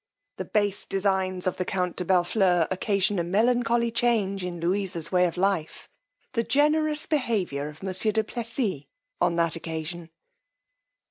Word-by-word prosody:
_The - - -6
base 205 -2 0
designs 190 -2 0
of 185 - -1
the 185 - 0
count 180 -1 -2
de - - -1
Bellfleur 180 -1 +3
occasion 195 +1 +1
a - - +1
melancholy 235 +5 +2
change 215 -5 +1
in 175 -1 -4
Louisa's 175 -1 -2
way 180 -1 +4
of 170 - -6
life; 185 -4 -1 0.5
the 230 - +2
generous 300 +3 +2
behaviour 205 - -1
of 150 +4 -13
monsieur 190 +3 0
du 220 +1 +1
Plessis 230 - -3 0.4
on 170 - +2
that 170 -1 +1
occasion. 165 +1 -5
190 Hz, 145 wpm, -26 LUFS, 175-220 Hz, 0.5 s, way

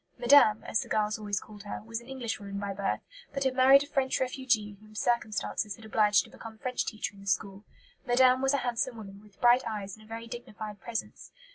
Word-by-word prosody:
"Madame," 240 -4 +6
as - - 0
the - - -7
girls 215 0 0
always 205 -2 -2
called 210 -1 -12
her, 205 - -6
was 230 +1 -4
an 235 - -16
Englishwoman 225 -6 -4
by 200 0 -3
birth, 195 0 -2 0.3
but 275 0 -1
had 265 -1 +1
married 265 +2 +7
a - - -11
French 265 -2 0
refugee 250 -5 0
whom 215 0 -17
circumstances 215 -2 -1
had 225 - -14
obliged 210 -1 +4
to - - -15
become 225 -1 -10
French 250 +1 -2
teacher 215 -2 -3
in 200 - -15
the 200 - -13
school. 195 +2 -1 0.4
Madame 255 0 +4
was 270 +1 +3
a 265 - -1
handsome 240 0 -1
woman, 200 -2 -10
with 210 -2 -21
bright 245 +1 +6
eyes 205 -3 -5
and 215 - -17
a - - -18
very 230 +1 -6
dignified 215 -3 -8
presence. 235 -2 -5
220 Hz, 220 wpm, -29 LUFS, 210-250 Hz, 0.4 s, married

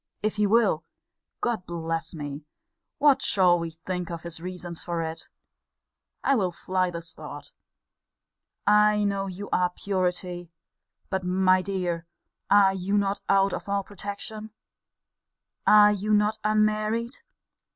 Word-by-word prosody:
If 215 0 0
he 210 0 +3
will 210 -7 +3 0.6
Lord 230 -6 -2
bless 165 0 -3
me! 145 -1 -6 0.5
what 280 -2 +4
shall 180 -6 +4
we 165 0 -3
think 175 +2 -5
of 170 -2 -6
his 170 -1 -7
reasons 180 -1 -6
for 170 -1 -2
it? 160 0 -6 0.9
I 275 - +3
will 195 -8 +1
fly 185 +1 -1
this 170 -1 -7
thought. - - -10 1.1
I 210 0 +5
know 200 -1 0
your 195 +2 -7 0.2
purity 180 -2 -2 0.6
But, 190 -1 -1
my 185 +1 +3
dear, 180 -3 -3 0.4
are 195 -1 +6
you 190 +2 -1
not 200 0 0
out 195 0 +4
of - - -5
all 200 0 0
protection? 205 +2 -7 1.2
Are 210 0 +8
you 210 +1 +1
not 210 +1 +1
unmarried? 215 +3 +1
190 Hz, 130 wpm, -26 LUFS, 175-210 Hz, 1.2 s, Are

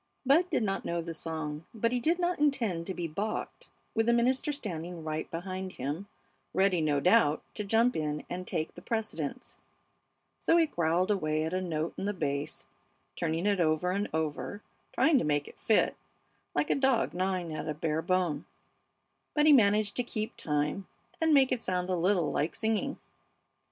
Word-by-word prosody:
Bud 325 +7 +4
did 310 - +1
not 195 -2 -1
know 170 0 -2
the 165 0 -4
song, 160 -2 -4
but 230 +1 +1
he 250 - +1
did 325 +8 +2
not 355 -2 0
intend 230 - +1
to 190 - -2
be 170 - -2
balked 200 +8 -4 0.2
with 225 0 +1
the 235 - +5
minister 255 +5 +2
standing 175 - -5
right 155 0 -3
behind 185 +2 -5
him, 150 +9 -4 0.5
ready, 190 -3 +3
no 150 -2 +2
doubt, 175 -3 +4
to 210 - -4
jump 225 +4 +3
in 150 -1 -2
and 180 +1 -5
take 155 - -2
the - - -11
precedence; 220 - -4 0.8
so 335 - +3
he 330 - +5
growled 175 - +1
away 155 -5 +1
at 160 +2 -2
a 185 - 0
note 165 -2 -2
in - - -2
the 205 - 0
bass, 140 -3 -2 0.5
turning 165 +2 -1
it 205 -2 +2
over 165 +2 +2
and 200 +2 -1
over 160 +1 -2
and 205 - -10 0.3
trying 320 -3 +4
to - - -1
make 145 -1 0
it - - -13
fit, 220 - +3 0.6
like - - +1
a - - +6
dog 265 - +2
gnawing 180 -2 -1
at 155 0 -4
a - - 0
bare 155 +1 -1
bone; 175 -4 0 0.9
but 295 0 +4
he 305 - +8
managed 210 -4 +4
to - - +3
keep 215 -2 -4
time 150 +5 -1 0.3
and 320 0 +3
make 270 -3 +5
it 250 -2 0
sound 180 -1 -1
a - - +2
little 175 -1 +2
like 150 +3 -1
singing. 225 +5 -1
185 Hz, 185 wpm, -30 LUFS, 160-225 Hz, 0.9 s, he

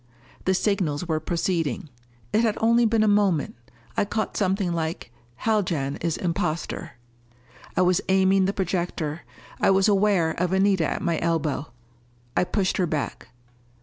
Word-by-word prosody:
The 190 - +3
signals 180 -5 0
were 160 -2 0
proceeding. 165 -4 -1 0.5
It 220 - +4
had 225 -3 +1
only 230 +1 +4
been 220 0 +2
a - - +3
moment. 200 -7 +2 0.4
I - - +2
caught 215 +2 -2
something 190 -2 0
like, 160 -7 -4 0.3
"Haljan 175 -11 0
is 165 -2 -2
imposter." 170 0 -2 0.8
I - - +5
was 180 -1 +3
aiming 190 0 +4
the 195 - +1
projector. 170 -4 -2 0.4
I - - +3
was 195 +1 +4
aware 195 -5 +3
of 180 +2 -1
Anita 190 -4 +3
at - - -3
my 170 -2 0
elbow. 160 -3 -1 0.7
I - - +3
pushed 190 0 0
her 180 - +1
back. 155 -3 -3
180 Hz, 150 wpm, -25 LUFS, 165-200 Hz, 0.8 s, I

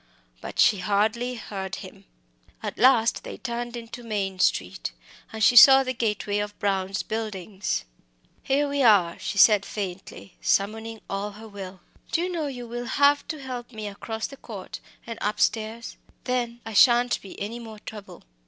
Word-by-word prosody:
But - - -8
she 220 -5 +5
hardly 215 +6 0
heard 195 -4 -5
him. - - -11 0.6
At - - -5
last 240 -3 +4
they - - -7
turned 240 0 -4
into 235 +1 -8
Maine 200 -5 -3
Street, 90 - 0 0.4
and 220 -1 -3
she 245 - +6
saw 270 +1 +10
the 255 0 -2
gateway 210 -3 -1
of 205 0 -4
Brown's 195 -1 -1
Buildings. 205 - -3 0.6
"Here 285 +2 +1
we 285 0 -1
are," 200 -9 +4
she 190 +2 -4
said 210 0 +7
faintly, 195 -2 -7
summoning 220 +2 0
all 200 +1 -3
her 220 +2 -11
will; 190 -3 -9 0.3
"do - - +1
you 360 +1 -2
know 325 -4 -2
you 245 -3 -6
will 240 +1 -5
have 285 +3 +3
to 305 -2 -6
help 250 -2 -6
me 215 -2 -6
across 220 +2 -5
that 275 - -9
court, 200 -5 -8 0.3
and 230 -1 -7
upstairs 220 +2 -1 0.3
then 240 -1 -2
I 225 - -6
shan't 240 +2 +5
be 195 - -11
any 220 +4 -4
more 225 -2 -9
trouble." 210 -1 -10
220 Hz, 165 wpm, -25 LUFS, 200-240 Hz, 0.6 s, saw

